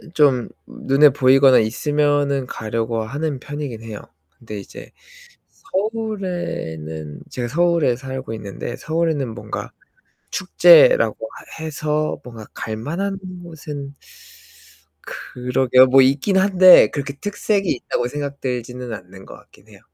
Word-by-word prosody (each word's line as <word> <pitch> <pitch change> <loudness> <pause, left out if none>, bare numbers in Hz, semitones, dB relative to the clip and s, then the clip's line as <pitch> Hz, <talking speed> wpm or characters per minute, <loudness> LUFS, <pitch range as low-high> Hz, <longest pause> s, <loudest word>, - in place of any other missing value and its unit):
좀 135 -6 +3 0.2
눈에 140 +2 +3
보이거나 135 0 +5
있으면은 145 +3 0
가려고 115 0 -3
하는 140 +4 -3
편이긴 145 -5 -6
해요. 110 -2 -7 0.4
근데 110 -3 -8
이제 100 - -11 1.0
서울에는 170 - -5
제가 120 -1 -4
서울에 170 -2 +2
살고 130 -2 -6
있는데 110 +3 -6
서울에는 155 -7 -2
뭔가 - - -6 0.6
축제라고 - - +5 0.5
해서 155 -1 -2
뭔가 115 -3 -10
갈만한 170 - -4 0.2
곳은 150 -4 -8 1.1
그러게 125 0 +2
뭐 130 +1 +5
있긴 140 +9 +2
한데 190 -1 +7
그렇게 140 -1 -4
특색이 205 +3 -2
있다고 120 -1 -2
생각되지는 125 -3 -5
않는 95 -2 -10
거 - - -12
같긴 - - -21
해요. - - -17
140 Hz, 260 characters per minute, -20 LUFS, 120-160 Hz, 1.1 s, 한데